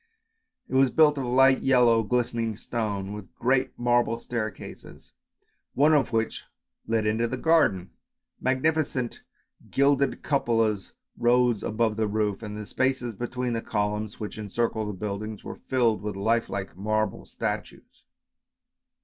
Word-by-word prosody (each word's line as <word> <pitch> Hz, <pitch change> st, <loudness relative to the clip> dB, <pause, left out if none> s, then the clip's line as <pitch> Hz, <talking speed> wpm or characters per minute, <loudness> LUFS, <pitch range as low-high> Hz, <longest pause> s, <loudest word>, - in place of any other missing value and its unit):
It -, -, -10 dB
was 135 Hz, 0 st, +5 dB
built 150 Hz, 0 st, +4 dB
of 130 Hz, -, -2 dB
light 130 Hz, +2 st, +4 dB
yellow 120 Hz, -4 st, +4 dB
glistening 115 Hz, -1 st, -1 dB
stone, 105 Hz, -4 st, -3 dB
with 105 Hz, -3 st, -10 dB
great 130 Hz, +2 st, +1 dB
marble 120 Hz, -1 st, +2 dB
staircases, 115 Hz, -3 st, -7 dB, 0.6 s
one 150 Hz, +3 st, +5 dB
of 145 Hz, -5 st, +2 dB
which 115 Hz, -1 st, -1 dB, 0.4 s
led 115 Hz, -1 st, +1 dB
into 110 Hz, +2 st, +1 dB
the 130 Hz, -, -3 dB
garden. 125 Hz, -, +2 dB, 0.5 s
Magni 130 Hz, +5 st, +2 dB
ficent 135 Hz, -6 st, -2 dB, 0.5 s
gilded 140 Hz, 0 st, +2 dB
cupolas 115 Hz, -7 st, 0 dB, 0.3 s
rose 120 Hz, -2 st, +3 dB
above 110 Hz, 0 st, 0 dB
the 110 Hz, -1 st, +1 dB
roof, 105 Hz, -1 st, -1 dB
and 105 Hz, -1 st, -6 dB
the 105 Hz, -, -6 dB
spaces 130 Hz, 0 st, -1 dB
between 120 Hz, +3 st, -3 dB
the 115 Hz, -, -1 dB
columns 105 Hz, 0 st, -2 dB
which 105 Hz, 0 st, -6 dB
encircled 110 Hz, +1 st, -2 dB
the -, -, -4 dB
building 105 Hz, +2 st, -5 dB
were -, -, -8 dB
filled 120 Hz, -4 st, +2 dB
with 105 Hz, -1 st, -4 dB
life 115 Hz, +4 st, +1 dB
like 100 Hz, -1 st, -5 dB
marble 110 Hz, +1 st, -1 dB
statues. -, -, -5 dB
115 Hz, 140 wpm, -26 LUFS, 105-130 Hz, 0.6 s, was